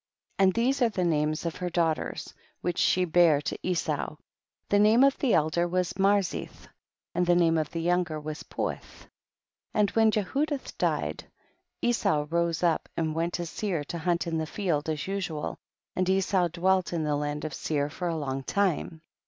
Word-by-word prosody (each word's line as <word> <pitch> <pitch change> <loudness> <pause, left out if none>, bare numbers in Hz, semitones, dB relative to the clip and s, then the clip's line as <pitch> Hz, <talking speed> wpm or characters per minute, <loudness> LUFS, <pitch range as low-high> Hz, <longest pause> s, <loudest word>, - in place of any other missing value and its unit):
22. - - +5
And 190 -1 +5
these 260 +4 +1
are 240 - +5
the 190 -4 -2
names 155 -1 0
of 165 - -3
her 180 -1 -3
daughters 165 -2 -1 0.3
which 175 0 -2
she 185 0 +3
bare 165 -3 +5
to - - -3
Esau, 165 -4 -1 0.5
the 205 - +3
name 215 +5 +6
of 275 0 +5
the 260 -5 +3
elder 160 +3 +2
was 180 0 0
Marzith, 195 -1 0 0.5
and 175 0 +1
the 175 - +5
name 165 -2 +4
of 155 -2 0
the 165 +1 -4
younger 175 -3 +1
was 150 0 -6
Puith. - - -3 0.9
23. - - -1
And 205 -1 +4
when 225 -1 +4
Jehudilh 270 - -1
died, - - -1 0.6
Esau 155 -11 +2
rose 170 0 0
up 170 -2 +1
and 160 -1 0
went 165 +2 -1
to 175 - -3
Seir 170 -2 -2
to 170 +4 -5
hunt 170 +2 0
in 165 -1 -1
the 160 - -2
field, 160 -5 -1
as 150 -3 -2
usual, 185 -6 -3 0.4
and 185 0 0
Esau 190 -1 +2
dwelt 185 +2 +1
in 165 -2 -1
the 150 -1 0
land 145 +1 -3
of 155 - -4
Seir 145 -1 -1
for 175 +4 -4
a 165 -1 -1
long 135 -3 -3
time. 165 0 -1
170 Hz, 185 wpm, -28 LUFS, 155-190 Hz, 0.9 s, name